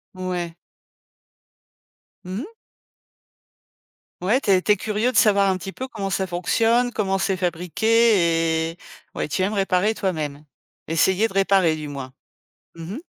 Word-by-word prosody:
Ouais. 180 -2 -4 1.7
Mmh 185 +3 -4
mh. 390 - -10 1.7
Ouais, 215 +9 +2
tu 205 - 0
es 185 -1 +4
tu 210 - +1
es - - -2
curieux 215 +5 -1
de 240 - -2
savoir 200 -2 +4
un 190 - +1
petit 190 +2 -7
peu 260 - -6
comment 205 -6 -5
ça 190 0 -1
fonctionne? 225 +7 +1
Comment 195 -3 0
c'est 195 0 0
fabriqué? 175 -2 +2
Et 165 - -15 0.4
ouais, - - -2
tu 150 - -2
aimes 200 +3 0
réparer 195 +2 +1
toi-même. 150 -6 -3 0.4
Essayer 190 +6 +2
de 220 - -13
réparer 195 -4 +3
du 155 -1 -6
moins. 135 -2 -7 0.6
Mmh 165 +4 -7
mh. - - -5
190 Hz, 150 wpm, -22 LUFS, 170-210 Hz, 1.7 s, es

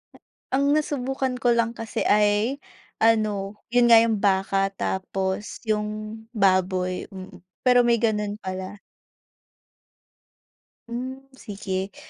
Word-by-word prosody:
Ah. - - -17 0.4
Ang 280 +1 +3
nasubukan 270 -3 -2
ko 245 - +3
lang 230 0 +1
kasi 225 -1 -4
ay 210 +6 +2 0.4
ano, 210 -3 +1 0.2
yun 240 -1 +5
nga 230 - +10
yung 225 -2 +2
baka, 195 0 +2
tapos 190 +1 -3
yung 215 +1 -3
baboy. 185 -3 +1
Mm. 190 -1 -10 0.2
Pero 245 -1 +6
may 235 -1 +3
ganun 210 -2 0
pala. 190 +1 -6 2.1
Hmm, 260 +3 -5
sige. 195 -5 -5
210 Hz, 110 wpm, -24 LUFS, 195-235 Hz, 2.1 s, nga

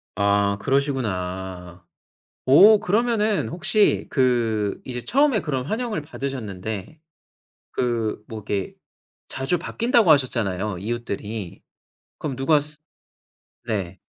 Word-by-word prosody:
아 100 0 +2
그러시구나. 95 - -2 0.6
오, 200 +11 +8
그러면은 215 +1 +1
혹시 200 +5 +2
그 115 -6 +1
이제 125 -1 -4
처음에 270 - +2
그런 135 -6 -2
환영을 220 - -2
받으셨는데 125 - -6 0.7
그 115 -4 -1
뭐 110 - -6
이렇게 100 -2 -3 0.5
자주 135 +7 -1
바뀐다고 230 +2 +2
하셨잖아요, 105 -8 +1
이웃들이. 105 -3 -5 0.6
그럼 140 -4 -4
누가 145 +3 +3
스 150 +1 -8 0.9
네. 95 -5 -3
125 Hz, 235 characters per minute, -23 LUFS, 100-155 Hz, 0.9 s, 오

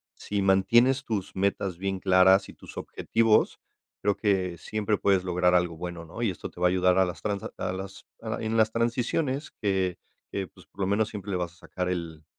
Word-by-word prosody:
si 105 -1 -3
mantienes 120 +8 +4
tus 100 -4 -3
metas 95 -2 0
bien 95 +1 -2
claras 95 +1 +5
y - - -10
tus - - -13
objetivos, 115 -1 +1 0.4
creo 100 0 +2
que 95 -4 0
siempre 105 -1 -1
puedes 95 -2 +3
lograr 90 0 +2
algo 90 -2 +1
bueno, 85 0 -6
¿no?, 95 +8 -8
y 115 - +2
esto - - -7
te 90 - -12
va 90 - +5
a - - +4
ayudar 90 0 +3
a 95 - +5
las 90 - -6
transac 100 -2 -2
a 90 - -2
las 95 +1 -7 0.3
en 110 0 -2
las 110 0 +4
transiciones 130 +5 -1
que 95 -3 0 0.3
que, 95 -2 -3
pues, - - -19
por 100 - -10
lo 95 - +1
menos, 105 +2 +1
siempre 100 -1 -6
le 90 - 0
vas 85 -1 -3
a - - -22
sacar 90 -1 -2
el 85 -3 -4
95 Hz, 210 wpm, -27 LUFS, 90-105 Hz, 0.4 s, claras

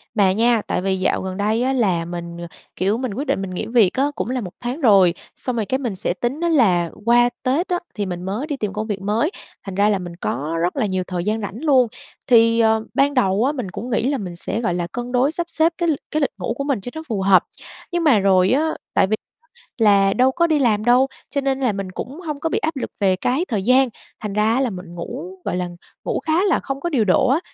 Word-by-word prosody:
Mà 195 -2 +4
nha, 230 +2 +3
tại - - -1
vì 190 0 0
dạo 185 - +1
gần 185 0 -5
đây 215 +4 +1
á 265 +1 +1
là 185 -9 +1
mình, 170 0 -6 0.4
kiểu, 200 +5 +1
mình 255 -5 -3
quyết 280 +7 -4
định - - 0
mình 195 - -4
nghỉ 180 - -3
việc 225 -5 +3
á, 280 +2 +1
cũng - - -3
là 255 -1 -1
1 180 -4 -7
tháng 250 +6 -4
rồi, 195 - +5 0.2
xong 250 -2 -3
rồi 220 - -1
cái 260 +7 0
mình 240 -7 -3
sẽ 185 -1 -1
tính 240 - -3
á 340 - +1
là 185 - +3 0.2
qua 240 +1 +5
Tết 280 +8 +1
á, 355 -1 0 0.2
thì 205 - -2
mình 180 -1 -5
mới 205 +10 -3
đi 290 -3 -3
tìm 210 -5 -3
công 215 +1 -3
việc 200 -3 -3
mới, 220 - 0 0.3
thành 195 -2 -6
ra 205 +2 +3
là 200 -2 +1
mình 175 -2 -7
có 155 -1 -3
rất 175 +1 0
là 265 -6 +1
nhiều 185 -2 -1
thời 180 -2 -3
gian 215 +1 0
rảnh 205 +6 -6
luôn. 265 -5 +4 0.4
Thì, 230 -1 +5
ờ, 220 -1 +3
ban 280 +1 +2
đầu 210 -5 +2
á, 280 - +2
mình 250 -10 -5
cũng 240 - -6
nghĩ 240 +1 +1
là 280 - 0
mình 180 -4 -6
sẽ, 215 +5 -3
gọi 200 -7 0
là, 175 -1 -2
cân 245 +6 -6
đối 255 +3 +2
sắp 340 +1 -3
xếp 330 0 +2
cái 340 -1 0
l - - +4 0.2
cái 310 - 0
lịch 280 - +1
ngủ 185 - -2
của 275 - -2
mình 275 -7 -1
cho 245 - -6
nó 315 - -4
phù 215 -5 -2
hợp, 190 -1 +5 0.5
nhưng 345 -1 0
mà 275 -10 +5
rồi 190 -1 +4
á, 315 +4 +2 0.2
tại - - +3
vì 215 - +1 0.6
là 200 -4 +4
đâu 255 +3 +3
có 340 +5 +2
đi 310 -2 +2
làm 215 -5 +2
đâu, 250 +2 +5 0.2
cho 280 - -1
nên 270 -1 0
là 255 -4 +1
mình 195 -1 -5
cũng 265 - -7
hông 300 -5 -5
có 325 - -1
bị - - 0
áp 320 -1 -2
lực 265 - -4
về 195 -2 +3
cái 255 - 0
thời 210 -6 -1
gian, 255 +3 +4 0.3
thành 210 -2 -5
ra 210 +2 +2
á 260 - +1
là 260 - +1
mình 180 -3 -9
ngủ, 175 +1 -6
gọi - - -1
là, 180 -1 -2 0.3
ngủ - - -1
khá 325 +4 +1
là 390 - +2
không 275 0 -5
có 345 - -2
điều 255 -9 +1
độ 205 +7 +3
á, 270 +5 +3
225 Hz, 270 wpm, -21 LUFS, 190-270 Hz, 0.6 s, rồi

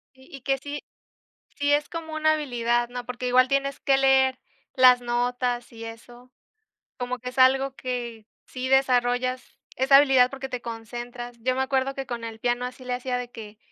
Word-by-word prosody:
Y 260 +1 -18
y - - -13
que 270 0 0
sí, 285 +2 -7 0.7
sí 285 0 +1
es 290 0 +2
como 325 -2 -6
una 310 0 +3
habilidad, 240 -5 0
¿no? 245 0 -7
Porque 250 0 -4
igual 255 +1 +4
tienes 275 0 0
que 275 - +3
leer 265 -1 +3 0.4
las 255 -1 +7
notas 245 0 -1
y 230 -1 -9
eso. 240 +2 -12 0.7
Como 250 0 -3
que 250 0 -6
es 255 - -13
algo 265 +1 +4
que 240 -4 -5 0.2
sí 255 0 -5
desarrollas 255 -1 +1 0.2
esa 265 +2 +6
habilidad 265 -3 +5
porque 270 -1 -6
te 250 -2 -4
concentras. 240 +1 -7
Yo 255 +2 0
me 265 - 0
acuerdo 265 0 0
que 270 0 -5
con 235 -2 -5
el 225 -1 -7
piano 245 +1 0
así 255 +1 -10
le 250 0 -2
hacía 250 0 -2
de 245 -1 -5
que 215 -3 -11
250 Hz, 190 wpm, -25 LUFS, 245-270 Hz, 0.7 s, las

